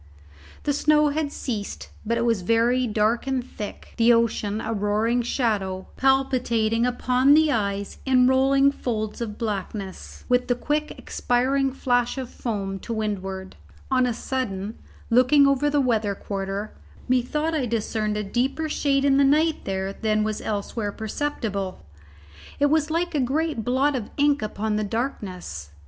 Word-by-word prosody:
The 290 - +1
snow 300 +1 +3
had 290 0 -1
ceased; 215 -8 -5
but 230 +2 0
it 235 - 0
was 230 -5 +1
very 235 +5 +2
dark 220 +3 +1
and 265 -2 0
thick, 210 -5 -8
the 235 0 +5
ocean 220 -2 +1
a 225 0 -3
roaring 215 +3 +1
shadow, 205 -6 -1
palpitating 250 -4 +2
upon 250 +3 +3
the 310 -1 +4
eyes 200 -4 -2
in 255 -2 +4
rolling 270 +2 +4
folds 215 -5 -3
of 210 -3 -4
blackness, 200 -3 -5
with 250 0 +2
the 245 - +2
quick 300 +4 -1
expiring 265 +2 0
flash 245 -1 0
of 260 -2 -5
foam 195 -4 -3
to 230 - -8
windward. 195 -3 -4 0.4
On 255 -1 +3
a - - 0
sudden, 220 -5 -3 0.3
looking 255 +4 +6
over 275 +1 +3
the 290 0 +2
weather 220 -6 +1
quarter, 195 +1 -4 0.3
methought 280 +6 +1
I 280 -6 0
discerned 215 -1 -1
a 210 - -1
deeper 260 +9 -1
shade 280 -2 +1
in 275 -1 +4
the 280 - +5
night 310 +3 +2
there 190 0 -2
than 215 0 0
was 215 0 -2
elsewhere 205 0 -3
perceptible. 215 - -3 0.7
It 285 0 +3
was 310 -1 +2
like 340 +2 -1
a 295 - +1
great 275 -1 0
blot 265 +4 +2
of 230 -5 -4
ink 290 0 +3
upon 215 0 -2
the 215 - 0
darkness. 195 - -4
240 Hz, 155 wpm, -24 LUFS, 210-270 Hz, 0.7 s, looking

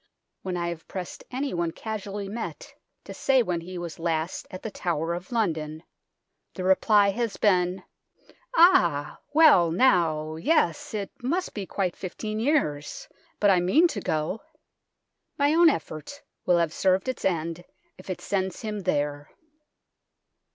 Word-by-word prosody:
When 185 -2 -3
I 170 0 -1
have 170 -1 -7
pressed 185 -2 -7
anyone 250 -11 -2
casually 205 +1 -5
met 235 - -6 0.3
to - - -9
say 265 -2 +3
when 175 -5 -2
he 180 +2 -8
was 170 -2 -6
last 165 0 -2
at 185 -2 -9
the 220 - -4
Tower 170 -3 -2
of 175 +4 -7
London, 160 -8 -1 0.7
the 185 - -4
reply 200 +2 +4
has 230 0 -2
been: 180 -2 +2 0.4
" - - -29
Ah! 175 - +4
well 290 - +6
now 160 -6 +2
yes, 215 - +1
it 200 -2 -4
must 345 +10 -1
be 200 -3 -5
quite 185 -3 -2
fifteen 215 +3 -5
years; 270 - -1 0.3
but 205 -1 +5
I 185 - +4
mean 260 - +4
to 205 - -4
go." 155 +7 -2 1.0
My 290 0 +3
own 335 0 +7
effort 160 - -5 0.2
will 180 -1 +5
have 165 -2 +1
served 190 +4 +1
its 255 - -3
end 170 -1 -1 0.4
if - - -13
it 185 - -4
sends 190 -2 -2
him 215 -2 -4
there. 145 -5 -1
185 Hz, 150 wpm, -26 LUFS, 170-225 Hz, 1.0 s, own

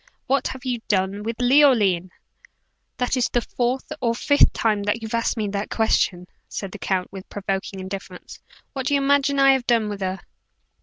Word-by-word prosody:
What 275 -1 +1
have 260 0 -8
you 245 -2 -1
done 195 0 0
with 225 +2 -4
Leoline?" 245 -9 +4 0.9
"That 250 +1 0
is 255 - +1
the 240 - +1
fourth 245 +2 -2
or 235 -2 +1
fifth 285 +4 +4
time 215 -2 0
that 210 +3 -1
you've 220 - -6
asked 230 0 0
me 215 -2 -1
that 200 +1 -3
question," 185 -5 +1 0.2
said 195 -2 -5
the - - -9
count, 185 -2 -1
with 195 -1 -10
provoking 195 -1 -4
indifference. 190 -1 -8 0.3
"What 265 -1 -3
do 285 - +2
you - - +3
imagine 280 0 +2
I 275 0 +6
have 260 -2 -2
done 230 -3 +2
with 205 -1 -6
her?" 190 0 -2
225 Hz, 190 wpm, -23 LUFS, 195-255 Hz, 0.9 s, I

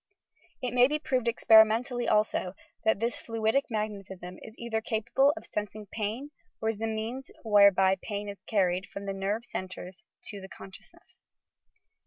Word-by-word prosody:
It 250 -1 -2
may 250 0 +6
be 300 +2 0
proved 255 -5 -1
experimentally, 230 +2 +5
also, 210 -3 +1 0.3
that 220 -2 +2
this 235 +2 -1
fluidic 225 +4 0
magnetism 195 -5 -5
is 220 - -11
cither 230 -2 -3
capable 230 +5 +2
of - - -8
sensing 210 0 -5
pain 225 +7 -3 0.3
or 220 - 0
is 220 -2 -3
the 225 - -1
means 225 +4 -4
whereby 200 -3 +5
pain 205 -1 -4
is 200 -1 -8
carried 185 -3 +1
from 200 - -7
the 195 - -2
nerve 200 +4 -2
centrea 185 -4 -6 0.4
to 200 -2 -7
the 190 - -10
consciousness. 190 0 -14
220 Hz, 155 wpm, -29 LUFS, 200-235 Hz, 0.4 s, may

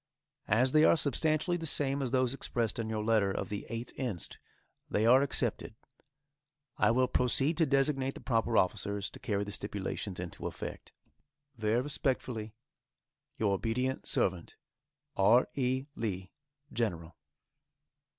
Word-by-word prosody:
As 125 +5 +4
they 155 +1 +5
are - - +6
substantially 155 +5 +1
the 165 -1 -4
same 140 -1 +2
as 130 - -1
those 130 0 +1
expressed 120 -3 -2
in 110 -1 -2
your 110 -1 -2
letter 110 -3 +3
of - - -3
the 105 0 -5
8th 115 +1 -5
inst., 115 - -4 0.5
they 105 - +1
are 125 +3 +7
accepted. 120 -5 -2 1.0
I - - +3
will 130 +2 +3
proceed 135 +6 +2
to 165 -3 +3
designate 135 -1 +1
the - - -8
proper 115 -2 +1
officers 100 +1 0
to - - -11
carry 100 -2 -1
the 100 - -6
stipulations 100 -2 -4
into 90 -2 -5
effect. - - -7 0.6
Very 110 +1 +1
respectfully, 125 -6 -2 0.8
Your 105 -3 +1
obedient 125 +6 -1
servant, 90 -3 0 0.6
R. 110 +6 +5
E. 130 0 0
LEE, 95 -4 -4 0.4
General. 85 -8 -2
115 Hz, 140 wpm, -31 LUFS, 105-130 Hz, 1.0 s, are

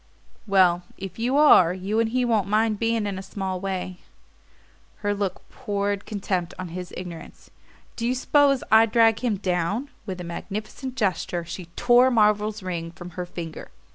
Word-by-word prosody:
"Well, 185 -3 +4 0.2
if 195 +2 -8
you 250 +4 +1
are, 185 - +6
you 195 +4 -1
and 230 -1 +2
he 250 +2 +1
won't 220 -5 +1
mind 215 0 +1
beginning 230 -1 0
in 195 -2 -3
a - - -5
small 190 -1 -4
way." 185 -1 -4 1.1
Her 205 - +2
look 200 -2 -4
poured 205 -4 -2
contempt 190 -4 -2
on 185 -1 -6
his 180 +1 -7
ignorance. 180 -2 -9 0.5
"Do 230 - -1
you 250 - +1
s'pose 275 +1 +3
I'd 220 0 +6
drag 225 -1 +4
him 230 -5 0
down?" 190 +8 -1 0.2
With 185 -2 -5
a - - -5
magnificent 215 +9 -6
gesture 185 -6 -1
she 175 +2 -7
tore 245 +1 +5
Marvell's 210 -3 +2
ring 170 -2 -4
from 175 +1 -10
her 180 +1 -5
finger. 165 -2 -7
200 Hz, 170 wpm, -24 LUFS, 180-225 Hz, 1.1 s, are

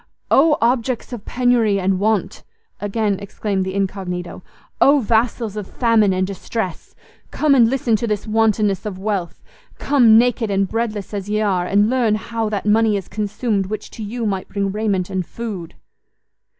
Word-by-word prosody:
"Oh 300 +2 +5
objects 245 +1 0
of 220 -4 -7
penury 240 -5 +2
and 190 0 0
want!" 215 -1 0 0.4
again 205 -1 -1
exclaimed 200 -1 -3
the 190 +1 -4
incognito; 185 -3 -3 0.4
"Oh 285 +1 +6
vassals 225 -2 0
of 210 -2 -5
famine 225 -4 +2
and 185 0 0
distress! 195 -1 -5 0.3
Come 300 -2 +2
and 235 -4 +5
listen 245 -3 +1
to 235 - -3
this 210 -2 -2
wantonness 215 -2 +1
of 195 -3 -5
wealth! 190 -3 -3 0.3
Come, 245 -6 +5
naked 235 -2 +2
and 195 -1 +1
breadless 220 -2 -3
as 200 0 -4
ye 210 0 0
are, 190 -4 0
and 205 +2 +3
learn 235 -3 +2
how 225 0 -3
that 205 -2 -3
money 215 0 +3
is 195 - -6
consumed 210 -1 -2
which 215 +2 -6
to - - -9
you 230 +3 -4
might 195 -3 -2
bring 200 -1 -2
raiment 200 -3 -1
and 185 -1 -1
food!" 195 -4 -7
210 Hz, 165 wpm, -20 LUFS, 195-230 Hz, 0.4 s, Oh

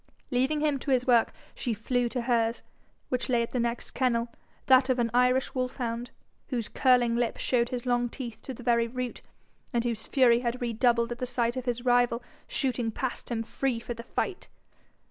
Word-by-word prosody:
Leaving 265 +4 +1
him 295 -3 +1
to 280 - -6
his 255 -2 +3
work, 240 -3 +4 0.2
she 235 -3 -2
flew 245 +2 0
to 250 0 -2
hers, 235 -1 +1 0.5
which 255 0 -1
lay 240 -2 +3
at 230 - -6
the 250 - -1
next 235 0 -2
kennel, 235 -2 +1 0.4
that 260 0 +5
of 255 - +3
an 235 -2 +1
Irish 250 +1 +3
wolf 255 -1 -2
hound, 240 -1 -3 0.4
whose 240 -5 -2
curling 245 -3 +3
lip 235 -1 0
showed 240 -2 +1
his 250 -1 -4
long 245 -1 +1
teeth 235 -3 -7
to - - -7
the 245 - -11
very 235 -1 +3
root, 250 0 -4 0.5
and 235 -1 +1
whose 230 -3 -3
fury 245 -3 +5
had 240 0 -2
redoubled 235 0 +2
at 240 - -4
the 250 - -2
sight 240 -1 0
of 255 -1 -4
his 245 0 -2
rival 245 -1 +3 0.2
shooting 255 - -1
past 245 +3 -4
him 230 -2 -1
free 245 +1 -1
for 240 - -5
the 230 - -8
fight. 360 - -3
245 Hz, 200 wpm, -28 LUFS, 235-255 Hz, 0.5 s, that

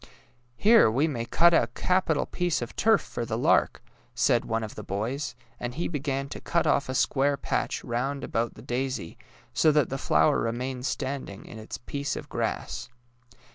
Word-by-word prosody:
^' - - -20 0.5
Here 220 - +6
we 135 +8 +2
may 120 -7 -3
cut 170 +7 +4
a - - +3
capital 180 -5 +1
piece 175 -7 -1
of 120 - -8
turf 220 -1 +4
for 120 - -5
the 110 -1 -2
lark," - - +2 0.3
said - - +3
one 115 0 -1
of 110 - -6
the - - -7
boys; 115 +8 -3 0.2
and 120 0 -4
he 170 - -1
began 140 -3 -2
to - - -7
cut 170 - 0
off 140 - +2
a 130 - -2
square 140 +2 +2
patch - - -2
round 130 +4 -2
about 115 +1 -1
the - - -12
daisy, 125 -8 -3 0.4
so 155 - +4
that 150 -2 +2
the 135 - -2
floAver 80 -8 +3
remained 125 +3 -2
standing 130 -7 -4
in 110 - -10
its 110 - -7
piece 140 +4 -4
of - - -7
grass. - - -3
135 Hz, 185 wpm, -27 LUFS, 115-150 Hz, 0.5 s, Here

